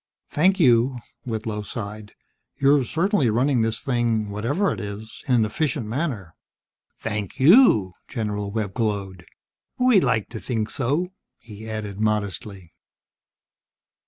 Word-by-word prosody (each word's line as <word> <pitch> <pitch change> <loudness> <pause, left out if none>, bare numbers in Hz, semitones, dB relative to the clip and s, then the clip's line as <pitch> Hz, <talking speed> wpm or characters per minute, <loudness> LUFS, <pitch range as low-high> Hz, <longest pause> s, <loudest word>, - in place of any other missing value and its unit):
"Thank 190 +6 +3
you," 125 -3 +4 0.3
Whitlow 110 -2 -3
sighed. 105 -1 -7 0.5
"You're 140 0 +4
certainly 165 - +1
running 125 +3 +2
this 110 0 0
thing 115 -5 0
whatever 120 - 0
it - - -7
is 105 +2 -7
in 130 - +3
an 115 -2 +3
efficient 115 +2 -1
manner." 115 - -3 0.6
"Thank 105 0 -4
you!" 135 - +6
General 105 -4 -3
Webb 100 -2 -3
glowed. 100 -5 -3 0.5
"We 250 -5 +5
like 115 - +1
to 115 - -6
think 110 -3 -2
so," 150 +8 -1 0.2
he 110 -1 -11
added 105 -2 -5
modestly. 100 -4 -2
110 Hz, 125 wpm, -23 LUFS, 105-135 Hz, 0.6 s, you